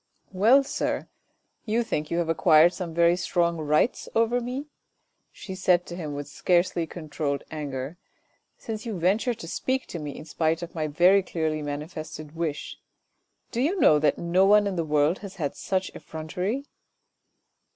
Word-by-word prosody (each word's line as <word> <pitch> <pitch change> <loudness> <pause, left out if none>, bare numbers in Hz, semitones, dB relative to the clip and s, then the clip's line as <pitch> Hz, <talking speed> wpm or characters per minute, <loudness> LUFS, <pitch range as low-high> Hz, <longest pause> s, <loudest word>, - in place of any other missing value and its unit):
" - - -40
Well, 265 +5 +7
sir, - - -2 0.5
you 230 +1 +1
think 155 -9 -3
you 170 - -1
have 170 -1 0
acquired 165 +1 +5
some 180 -3 -5
very 170 +1 +4
strong 170 -1 0
rights 155 +8 +1
over 230 +2 +2
me? 255 +4 -4 0.3
" - - -46 0.3
she 190 - -8
said 180 -2 +2
to 175 - -7
him 155 -5 -5
with 145 0 -5
scarcely 175 +3 +1
controlled 150 -3 -3
anger, 145 0 -5 0.3
" - - -42
since 215 -1 -6
you 225 -5 -4
venture 205 +8 +1
to 165 - -9
speak 260 +9 -1
to 170 - -5
me, 145 -2 -6
in - - -9
spite 160 +1 0
of 170 - -8
my 155 -2 -2
very 180 +6 +5
clearly 160 -4 -2
manifested 150 +1 -6
wish? 160 -3 -4 0.7
Do 235 - -1
you 345 +8 +1
know 150 - +6
that 150 -1 +2
no 175 +2 +2
one 205 +1 +6
in 200 -2 -1
the 170 - 0
world 150 +2 +2
has 200 -2 -9
had 145 -6 -3
such 190 -1 -2
effrontery 180 - -4
170 Hz, 175 wpm, -26 LUFS, 155-195 Hz, 0.7 s, Well